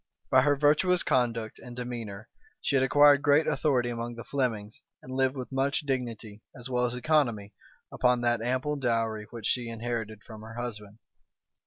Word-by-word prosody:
By 130 Hz, -, +6 dB
her 145 Hz, +2 st, +3 dB
virtuous 150 Hz, +5 st, +3 dB
conduct 115 Hz, -3 st, 0 dB
and 125 Hz, -1 st, -10 dB
demeanor 120 Hz, -4 st, -6 dB, 0.3 s
she 140 Hz, -, -1 dB
had 135 Hz, -, +4 dB
acquired 145 Hz, +1 st, +6 dB
great 145 Hz, +2 st, +4 dB
authority 125 Hz, -5 st, +1 dB
among 120 Hz, 0 st, -5 dB
the 115 Hz, -, -8 dB
Flemings 115 Hz, -6 st, -3 dB, 0.2 s
and 130 Hz, -, -10 dB
lived 130 Hz, 0 st, +1 dB
with 130 Hz, -1 st, -6 dB
much 135 Hz, +1 st, 0 dB
dignity, 120 Hz, -6 st, -4 dB
as 120 Hz, 0 st, -9 dB
well 125 Hz, -1 st, 0 dB
as 120 Hz, 0 st, -2 dB
economy, 125 Hz, -8 st, 0 dB, 0.4 s
upon 125 Hz, -1 st, +2 dB
that 120 Hz, -1 st, +1 dB
ample 130 Hz, +5 st, -1 dB
dowry 115 Hz, -4 st, -1 dB
which 115 Hz, -3 st, -8 dB
she 120 Hz, -2 st, 0 dB
inherited 115 Hz, -2 st, -4 dB
from 110 Hz, -2 st, -11 dB
her 110 Hz, +1 st, -10 dB
husband. 105 Hz, -4 st, -6 dB
120 Hz, 170 wpm, -28 LUFS, 115-135 Hz, 0.4 s, By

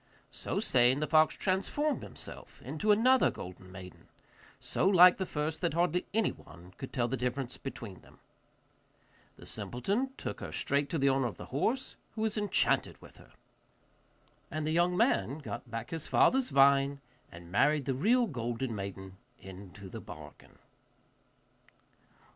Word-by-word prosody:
So -, -, -3 dB
saying, 125 Hz, +2 st, +3 dB
the 150 Hz, -, 0 dB
fox 155 Hz, +1 st, +4 dB
transformed 240 Hz, +11 st, 0 dB
himself -, -, -9 dB
into 215 Hz, 0 st, 0 dB
another 250 Hz, +5 st, +5 dB
golden 90 Hz, +1 st, -9 dB
maiden, 90 Hz, -1 st, -11 dB, 0.5 s
so -, -, 0 dB
like 180 Hz, -2 st, +8 dB
the 190 Hz, -, -3 dB
first 150 Hz, +1 st, -3 dB
that 170 Hz, -3 st, 0 dB
hardly 175 Hz, +1 st, +1 dB
anyone 90 Hz, -, -3 dB
could 135 Hz, -, -7 dB
tell 120 Hz, -2 st, 0 dB
the 130 Hz, -, -1 dB
difference 125 Hz, 0 st, -2 dB
between 115 Hz, -8 st, -8 dB
them. -, -, -19 dB, 1.2 s
The -, -, -13 dB
simpleton 200 Hz, -, -2 dB
took -, -, -5 dB
her -, -, -6 dB
straight 140 Hz, 0 st, 0 dB
to 170 Hz, -, -1 dB
the 140 Hz, -1 st, +3 dB
owner 135 Hz, -1 st, +2 dB
of 115 Hz, -, -7 dB
the -, -, -8 dB
horse, 235 Hz, -, -1 dB, 0.2 s
who 220 Hz, -, -4 dB
was 220 Hz, -1 st, 0 dB
enchanted 205 Hz, -3 st, +1 dB
with -, -, -16 dB
her. -, -, -18 dB, 1.2 s
And 155 Hz, -1 st, -3 dB
the 155 Hz, -, 0 dB
young 175 Hz, +2 st, +2 dB
man 220 Hz, -, +2 dB
got 140 Hz, -4 st, -7 dB
back 115 Hz, -1 st, -5 dB
his 165 Hz, -2 st, -5 dB
father's 260 Hz, -1 st, +3 dB
vine 140 Hz, 0 st, +4 dB, 0.3 s
and 85 Hz, 0 st, -12 dB
married 145 Hz, +7 st, +3 dB
the 135 Hz, -, 0 dB
real 235 Hz, -, +3 dB
golden 120 Hz, -, -3 dB
maiden 95 Hz, -2 st, -7 dB, 0.2 s
into 95 Hz, 0 st, -11 dB
the -, -, -8 dB
bargain. -, -, -12 dB
140 Hz, 155 wpm, -31 LUFS, 115-185 Hz, 1.2 s, like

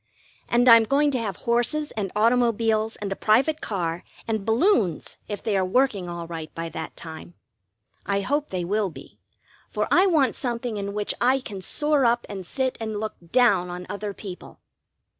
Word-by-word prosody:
And 240 Hz, +1 st, +3 dB
I'm 230 Hz, -2 st, +8 dB
going 285 Hz, +4 st, +2 dB
to 255 Hz, -, 0 dB
have 205 Hz, -5 st, -3 dB
horses 240 Hz, +6 st, +1 dB
and 200 Hz, -4 st, -3 dB
automobiles 225 Hz, -1 st, +2 dB
and 205 Hz, -1 st, -5 dB
a -, -, -1 dB
private 275 Hz, +11 st, +2 dB
car 175 Hz, -4 st, -2 dB, 0.2 s
and 220 Hz, -3 st, -1 dB
balloons, 225 Hz, -, +1 dB
if 205 Hz, -2 st, -5 dB
they 215 Hz, -3 st, 0 dB
are 190 Hz, -, +2 dB
working 200 Hz, -2 st, +1 dB
all 170 Hz, -1 st, -5 dB
right 165 Hz, -2 st, -7 dB
by 165 Hz, 0 st, -4 dB
that 160 Hz, 0 st, -7 dB
time. 160 Hz, +1 st, -9 dB, 0.7 s
I 200 Hz, 0 st, +1 dB
hope 290 Hz, +8 st, 0 dB
they 180 Hz, -2 st, -3 dB
will 205 Hz, +2 st, 0 dB
be, 140 Hz, -4 st, -13 dB, 0.5 s
for -, -, -1 dB
I 370 Hz, +3 st, +5 dB
want 305 Hz, -8 st, +3 dB
something 235 Hz, -2 st, -3 dB
in 200 Hz, 0 st, -4 dB
which 210 Hz, -1 st, -1 dB
I 255 Hz, +2 st, +4 dB
can 205 Hz, -7 st, -8 dB
soar 295 Hz, -, +1 dB
up 240 Hz, 0 st, +2 dB
and 190 Hz, -3 st, -7 dB
sit 260 Hz, +2 st, -2 dB
and 220 Hz, -2 st, -3 dB
look 215 Hz, 0 st, -3 dB, 0.2 s
down 200 Hz, -8 st, +4 dB
on 180 Hz, 0 st, -6 dB
other 205 Hz, 0 st, -4 dB
people. 190 Hz, -2 st, -10 dB
215 Hz, 180 wpm, -24 LUFS, 190-245 Hz, 0.7 s, I'm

